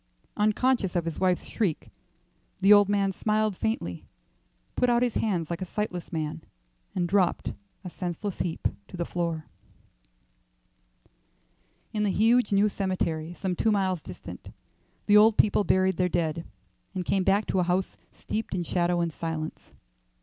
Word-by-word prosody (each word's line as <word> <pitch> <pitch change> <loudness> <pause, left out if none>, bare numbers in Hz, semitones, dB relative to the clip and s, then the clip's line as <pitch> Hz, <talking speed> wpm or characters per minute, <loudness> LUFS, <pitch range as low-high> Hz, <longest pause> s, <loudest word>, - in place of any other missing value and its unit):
Unconscious 215 -1 +1
of 170 -1 +1
his 165 - -4
wife's 185 -1 +1
shriek, 185 -9 -2 0.7
the 195 +2 +7
old 205 -1 +6
man 200 -1 +2
smiled 215 +1 0
faintly, 225 +7 -2 0.7
put 250 - +2
out 240 0 +3
his 245 -3 0
hands 175 -7 -1
like 170 +2 -3
a - - 0
sightless 180 -2 -4
man, 155 -1 -3 0.5
and 175 -1 0
dropped, 185 -1 +1 0.3
a 180 - -6
senseless 180 +3 -4
heap, 170 -3 -1 0.2
to - - -9
the 170 - -1
floor. 165 -3 -2 1.6
III. - - -33 0.8
In 210 - -1
the 210 - +2
huge 225 +4 +3
new 200 +1 +4
cemetery, 175 -5 -2
some 185 -1 -2
two 220 - +1
miles 190 -4 +1
distant, - - -10 0.5
the 210 0 +6
old 220 +1 +6
people 210 0 +4
buried 185 -2 +2
their 180 0 +2
dead, 165 -1 -1 0.5
and 180 -1 -2
came 195 +1 +1
back 200 +3 +3
to 190 - 0
a - - +3
house 180 +2 0 0.2
steeped 220 -3 -4
in 175 - -1
shadow 175 0 +1
and 170 -2 -1
silence. 160 0 -5
185 Hz, 155 wpm, -27 LUFS, 175-210 Hz, 1.6 s, the